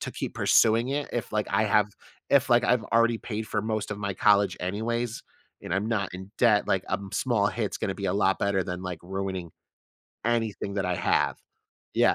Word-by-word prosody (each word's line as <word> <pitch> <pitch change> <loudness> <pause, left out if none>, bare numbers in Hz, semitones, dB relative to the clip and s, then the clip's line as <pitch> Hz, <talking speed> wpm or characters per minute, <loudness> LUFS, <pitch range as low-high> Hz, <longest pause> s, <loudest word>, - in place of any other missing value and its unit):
to - - -4
keep - - -5
pursuing 115 +2 +4
it, 145 +1 -2
if 120 - -3
like 105 0 0
I 105 +2 +2
have 105 -1 +3 0.4
if 140 -1 +4
like 120 0 +5
I've 125 -2 +2
already 115 0 +4
paid 110 -1 -5
for 105 -1 -1
most 110 -1 -2
of 105 - -4
my 100 -1 -3
college 100 -2 +3
anyways, 110 +5 -2 0.4
and 90 - -3
I'm 100 +3 0
not 105 -5 -1
in 95 +2 -8
debt, 110 -4 +4
like, 95 -1 +1
a - - -5
m 100 0 -5
small 110 -6 +1
hit's 110 -4 -3
gonna 95 - -2
be 100 - -6
a - - +1
lot 95 -1 +2
better 100 -1 +1
than, 90 +1 -5
like, 90 -3 -5
ruining 95 -1 -4 0.8
anything 115 -4 -1
that 100 -2 -1
I 90 - 0
have. - - +1 0.6
Yeah. - - +4
105 Hz, 210 wpm, -27 LUFS, 95-115 Hz, 0.8 s, like